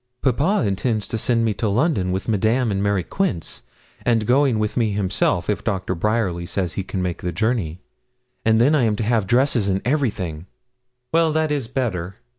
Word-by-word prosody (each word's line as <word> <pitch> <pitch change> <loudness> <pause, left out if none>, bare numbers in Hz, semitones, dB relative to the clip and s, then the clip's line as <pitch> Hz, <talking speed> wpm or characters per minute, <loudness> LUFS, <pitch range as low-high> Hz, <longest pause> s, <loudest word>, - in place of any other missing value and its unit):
'Papa 145 - +2
intends 105 +2 -1 0.2
sending 115 -2 +2
me 110 - +1
to 110 +3 -2
London 105 - +1
with 95 +2 -3
Madame 110 +3 +1
and 100 0 -1
Mary 100 -2 +1
Quince, 95 - -3 0.4
and 115 -3 +2
going 130 0 +3
with 105 0 -1
me 115 -4 +1
himself, 95 -3 0
if 105 -1 -1
Doctor 95 -4 -1
Bryerly 95 -2 -1
says 90 -2 -2
he 95 - -3
may - - 0
make 90 -2 -2
the 90 - -2
journey, 90 -3 -1 0.6
and 110 0 +3
then 135 +6 +4
I 150 - +3
am 110 -3 +2
to 110 - -2
have 110 -3 +1
dresses 120 -3 +2
and 95 0 +1
everything.' 100 - -1 0.7
'Well, 165 -1 +4
that 155 -1 +1
is 140 -6 -1
better. 100 -8 -2
110 Hz, 185 wpm, -22 LUFS, 95-125 Hz, 0.7 s, then